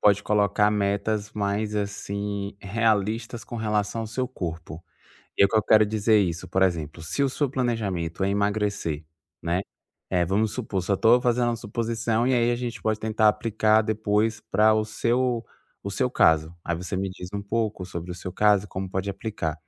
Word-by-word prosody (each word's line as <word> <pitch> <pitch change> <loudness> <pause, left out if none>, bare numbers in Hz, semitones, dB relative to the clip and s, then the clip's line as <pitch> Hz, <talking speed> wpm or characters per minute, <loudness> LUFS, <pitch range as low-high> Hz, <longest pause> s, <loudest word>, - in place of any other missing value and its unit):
pode 100 -1 +4
colocar 105 0 +2
metas 105 +1 -1
mais, 105 +1 -1
assim, 100 0 -3
realistas 110 +2 0
com 120 - -7
relação 105 0 -1
ao 110 - -4
seu 125 +4 -2
corpo. 85 -8 -6 0.5
E - - +6
o - - +4
que 110 - 0
eu 110 - +4
quero 110 -1 +5
dizer 110 +1 +3
isso? 90 -2 -1
Por 95 +2 +1
exemplo, 80 -3 -1
se 85 - -2
o 140 - +3
seu 145 +2 -1
planejamento 105 -10 -2
é 95 - +2
emagrecer, 100 -6 -1 0.4
né. 85 +3 0 0.5
É, 90 -2 +2
vamos 100 +4 +1
supor 110 -6 -3
só 100 +3 +1
estou 115 +5 +5
fazendo 120 0 +2
a 115 - -2
suposição 115 +1 -1
e 130 - +2
aí, 120 0 +3
a 120 - +1
gente 120 -2 -5
pode 110 -1 0
tentar 110 0 +2
aplicar 110 0 +2
depois 110 0 0
para 110 +1 +5
o 110 - +2
seu 120 +2 0 0.4
o 100 - -4
seu 125 +5 0
caso. 80 -5 +3
Aí 85 - -1
você 90 +2 -4
me 95 0 -2
diz 90 -1 -8
um 100 - -3
pouco 105 -2 -2
sobre 90 -1 -6
o - - -4
seu 90 +1 -7
caso 105 -1 +3
e - - -9
como 95 0 -4
pode 95 +1 -2
aplicar. 100 -5 -3
105 Hz, 190 wpm, -25 LUFS, 95-110 Hz, 0.5 s, E